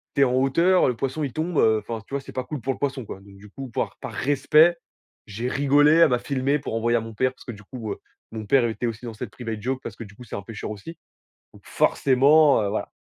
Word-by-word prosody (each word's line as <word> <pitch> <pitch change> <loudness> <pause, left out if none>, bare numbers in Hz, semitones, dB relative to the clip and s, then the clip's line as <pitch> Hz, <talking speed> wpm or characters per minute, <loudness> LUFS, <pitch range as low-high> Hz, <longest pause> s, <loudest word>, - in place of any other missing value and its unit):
tu 140 - +2
es - - +8
en 125 -1 +2
hauteur, 165 +8 +3
le 125 - 0
poisson 135 +5 -3
il 135 - -3
tombe, 160 +1 -2
heu, 110 -1 +4
enfin, 110 +1 -6
tu - - -13
vois 140 - -1
c'est - - -11
pas 130 - -3
cool 145 -2 -6
pour 135 - -1
le - - -12
poisson 135 -3 -2
quoi, 95 - -8
donc 100 0 -16
du 105 +1 -14
coup, 135 +4 -8
par - - -3
par - - -7
respect, 150 +5 +3 0.5
j'ai 115 +5 -4
rigolé, 145 +2 +4
elle 165 -2 +6
m'a 125 -1 +1
filmé 140 +3 -1
pour 115 - -5
envoyer 120 +1 +1
à - - -1
mon 115 0 -8
père 130 +3 +1
parce - - -17
que 120 - -5
du 105 -1 -12
coup, 110 -1 -7
heu, - - -13 0.3
mon 110 -1 -6
père 130 +3 +3
était 115 +1 -3
aussi 115 +1 -4
dans 115 - -6
cette 110 -1 -7
private 115 -4 -6
joke 130 +3 -2
parce 105 - -7
que 115 - -8
du 100 -1 -14
coup, 125 - -12
c'est 120 - -8
un 100 - -5
pêcheur 105 -1 -7
aussi, 160 +11 -9 0.6
donc - - -18
forcément, 140 0 +4
heu, 100 - -1
voilà. 110 - -3
125 Hz, 275 wpm, -24 LUFS, 110-140 Hz, 0.6 s, es